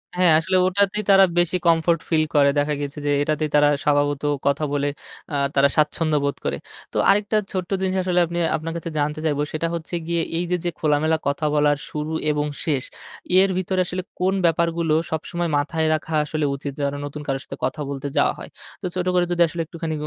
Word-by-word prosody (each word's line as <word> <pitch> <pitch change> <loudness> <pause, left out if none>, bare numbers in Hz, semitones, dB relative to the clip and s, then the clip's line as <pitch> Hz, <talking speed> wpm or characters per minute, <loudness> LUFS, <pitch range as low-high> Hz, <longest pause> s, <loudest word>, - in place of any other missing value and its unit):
হ্যাঁ, 180 -2 +4
আসলে 185 +3 +1
ওটাতেই 200 +2 +1
তারা 195 0 +8
বেশি 175 +1 +2
কমফোর্ট 165 0 +3
ফিল 155 -2 +3
করে। 140 -1 +6
দেখা 150 +1 0
গেছে 145 +1 -5
যে, 145 - +1
এটাতেই 155 +1 0
তারা 145 0 +6 0.2
স্বভাবত 145 -1 +1 0.3
কথা 140 +2 +1
বলে 145 0 +1 0.4
আ - - 0 0.2
তারা 140 0 +5
স্বাচ্ছন্দ্য 155 0 +2
বোধ 140 - 0
করে। 70 0 -1 0.4
তো - - -2
আরেকটা 205 +2 +3
ছোট্ট 185 -2 -3
জিনিস 190 0 0
আসলে 180 -1 +1
আপনি 170 +1 -5 0.2
আপনার 165 +1 -4
কাছে 170 - -5
জানতে 150 +1 -1
চাইব 145 -2 0
সেটা 160 +2 -1
হচ্ছে 170 +1 -5
গিয়ে 170 -1 0 0.2
এই 170 - 0
যে, 180 - +2
যে, 175 - 0
খোলামেলা 155 +1 +2
কথা 140 +2 -1
বলার 145 0 +3
শুরু 150 +1 -4 0.2
এবং 150 0 0 0.2
শেষ। 140 -5 0 0.6
এর 195 +1 +4
ভিতরে 185 0 -1
আসলে 180 +1 -4 0.2
কোন 185 +1 +2
ব্যাপারগুলো 170 -1 +1 0.2
সবসময় 170 +2 -2
মাথায় 160 +2 0
রাখা 155 +1 -3
আসলে 155 0 -2
উচিত 140 +1 -5
যেন 140 0 0
নতুন 145 +1 -7
কারো 135 -1 -1
সাথে - - -9
কথা 155 - -3
বলতে 140 0 -4
যাওয়া - - +3
হয়? - - -9 0.3
তো - - -5
ছোট 180 - -1
করে 180 -1 +3
যদি 175 0 +1
আসলে 170 +1 -4
একটুখানি 165 0 -5
160 Hz, 200 wpm, -22 LUFS, 145-175 Hz, 0.6 s, তারা